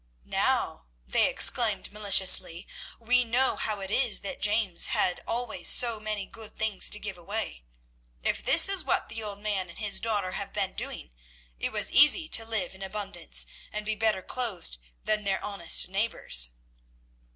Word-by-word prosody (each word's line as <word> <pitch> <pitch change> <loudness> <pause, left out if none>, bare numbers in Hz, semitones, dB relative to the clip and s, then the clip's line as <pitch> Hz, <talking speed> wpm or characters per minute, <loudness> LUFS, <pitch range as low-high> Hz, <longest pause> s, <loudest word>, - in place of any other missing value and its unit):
"Now," - - -2 0.2
they 60 - +2
exclaimed 220 -5 +2
maliciously, 195 -4 +3 0.3
"we 250 +2 +1
know 245 +3 0
how 210 -2 -4
it 195 0 -6
is 240 -1 0
that 200 - -7
James 205 -4 +2
had 180 - 0
always 245 +1 0
so 235 -3 +4
many 215 -2 -3
good 220 +1 -13
things 220 -3 +1
to 210 - -2
give 200 -4 -7
away. 180 - -5 0.6
If - - -2
this - - +6
is 390 -2 +1
what - - -1
the 220 +1 -7
old 205 -2 -5
man 200 -3 -3
and 170 - -11
his 210 -2 -2
daughter 205 -5 -1
have - - -6
been - - -1
doing, - - -7 0.5
it - - -3
was - - -2
easy 300 +4 +5
to 225 - +2
live 215 -6 -1
in 190 - -15
abundance 195 -3 0 0.3
and 210 0 -5
be 220 - -1
better 215 -3 +1
clothed 200 - -4 0.2
than 215 0 -1
their 195 -1 -2
honest 200 -5 +2
neighbours." 185 - 0
210 Hz, 165 wpm, -26 LUFS, 190-225 Hz, 0.6 s, this